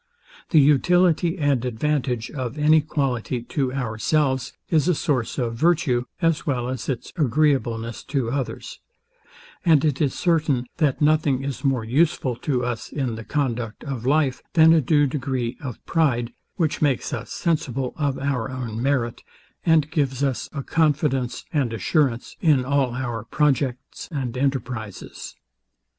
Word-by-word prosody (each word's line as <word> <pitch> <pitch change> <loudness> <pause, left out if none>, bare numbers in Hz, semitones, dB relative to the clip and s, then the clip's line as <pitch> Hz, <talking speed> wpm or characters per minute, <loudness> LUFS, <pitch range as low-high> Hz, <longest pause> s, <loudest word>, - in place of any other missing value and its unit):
The 160 - +5
utility 170 +4 +3
and 145 -6 +1
advantage 125 -1 -1
of 130 -1 -4
any 155 +1 +5
quality 130 -5 -2
to 130 +1 -1
ourselves 130 +2 0 0.2
is 160 -1 +2
a 180 - +3
source 135 -7 -1
of 120 -4 -1
virtue, 125 -3 +2 0.2
as 165 -2 +2
well 125 -4 -1
as 130 0 -4
its 130 -4 -4
agreeableness 125 -6 +1
to 130 -5 -1
others; 135 -2 -4 0.8
and 160 -4 +4
it 145 -2 0
is 140 -3 +1
certain, 155 -7 +1
that 150 -1 +1
nothing 150 -3 +2
is 140 +1 -4
more 135 -4 +1
useful 130 0 +1
to 125 -4 -1
us 120 -2 -4
in 130 -5 -2
the 110 0 -6
conduct 120 -5 -2
of 135 -6 -5
life, 140 0 +2
than 160 -1 +7
a 165 - +4
due 145 +2 +3
degree 130 -3 -2
of 125 -5 -5
pride, 125 -8 +1 0.2
which 160 -5 -1
makes 140 -5 +1
us - - -5
sensible 135 -6 -1
of 140 -3 -1
our 130 -3 -1
own 120 -3 -4
merit, 130 -3 0 0.5
and 155 -2 +4
gives 140 -3 0
us 135 -3 -1
a 140 -2 -5
confidence 140 -6 0
and 135 -6 0
assurance 120 - 0
in 145 -7 +3
all 135 -3 +1
our 120 -4 -3
projects 135 0 -1
and 130 -6 -3
enterprizes. 125 -5 -4
135 Hz, 150 wpm, -23 LUFS, 125-150 Hz, 0.8 s, than